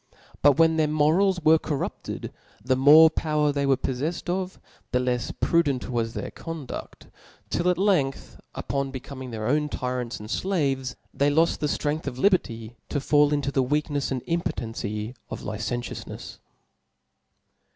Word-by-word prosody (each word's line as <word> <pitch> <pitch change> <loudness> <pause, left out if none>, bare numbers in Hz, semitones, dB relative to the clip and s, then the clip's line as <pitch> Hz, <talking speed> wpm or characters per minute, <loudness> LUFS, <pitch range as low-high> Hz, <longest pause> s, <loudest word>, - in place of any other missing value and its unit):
But 145 0 +5
when 165 0 +4
their 155 -1 +3
morals 160 +6 +3
were 160 0 +5
corrupted, 145 -3 -4 0.3
the 130 0 +3
more 145 +5 +8
power 150 -2 +1
they 140 -1 0
were 135 -1 +4
poflefled 145 +8 -3
of, 185 0 -3 0.3
the 125 - +2
lefs 125 -2 -1
prudent 145 -7 +1
was 115 -2 -1
their - - -4
cqnduft; 165 -5 -8 0.4
till 175 +1 +1
at 180 - +2
length,^ 180 -9 0 0.2
upon 140 -1 -2
becoming 130 0 -7
their 110 -2 -5
own 150 +3 +1
tyrants 125 -3 -3
and 105 - -8
flaves, 135 -10 -1 0.2
they 140 +1 +2
loft 160 +3 +2
the 150 - 0
ftrength 150 +1 -2
of 125 -3 -4
liberty 120 - 0
to 145 - -1
fall 145 +1 +3
into 145 -2 0
the 135 -1 +2
weaknefs 145 +1 -1
and 130 -2 -3
impotency 115 - -3 0.2
of - - -6
licentioufnefs. 115 +3 -5
145 Hz, 150 wpm, -25 LUFS, 125-160 Hz, 0.4 s, more